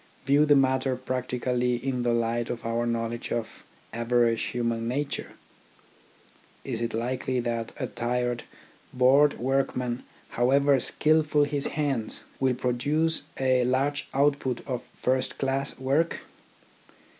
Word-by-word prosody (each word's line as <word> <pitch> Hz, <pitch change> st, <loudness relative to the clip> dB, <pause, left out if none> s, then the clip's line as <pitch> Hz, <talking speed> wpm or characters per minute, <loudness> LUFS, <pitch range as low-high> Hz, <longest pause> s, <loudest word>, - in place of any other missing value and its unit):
View 145 Hz, +3 st, +4 dB
the 145 Hz, -, +6 dB
matter 130 Hz, -1 st, +2 dB
practically 125 Hz, -1 st, -1 dB
in 125 Hz, +1 st, -2 dB
the 120 Hz, 0 st, +1 dB
light 115 Hz, 0 st, 0 dB
of 120 Hz, -1 st, -5 dB
our 115 Hz, +1 st, 0 dB
knowledge 115 Hz, 0 st, -3 dB
of 115 Hz, -2 st, -4 dB, 0.3 s
average 115 Hz, 0 st, +2 dB
human 115 Hz, -1 st, -2 dB
nature. 140 Hz, +4 st, -3 dB, 1.3 s
Is 120 Hz, -4 st, -3 dB
it 115 Hz, -1 st, -2 dB
likely 125 Hz, +2 st, -1 dB
that 115 Hz, -1 st, -2 dB
a -, -, -2 dB
tired, 120 Hz, 0 st, -1 dB, 0.5 s
bored 135 Hz, +3 st, +4 dB
workman, 125 Hz, -1 st, -1 dB, 0.3 s
however 135 Hz, +3 st, +3 dB
skilful 150 Hz, +3 st, +2 dB
his 145 Hz, -1 st, -1 dB
hands, 135 Hz, -7 st, -1 dB, 0.2 s
will 130 Hz, -2 st, +2 dB
produce 145 Hz, +7 st, 0 dB, 0.2 s
a 130 Hz, -1 st, +3 dB
large 135 Hz, +3 st, 0 dB
output 140 Hz, -3 st, +1 dB
of 125 Hz, -2 st, -3 dB
first 130 Hz, 0 st, -1 dB
class 135 Hz, 0 st, -1 dB
work? 140 Hz, +6 st, 0 dB
125 Hz, 120 wpm, -27 LUFS, 120-135 Hz, 1.3 s, the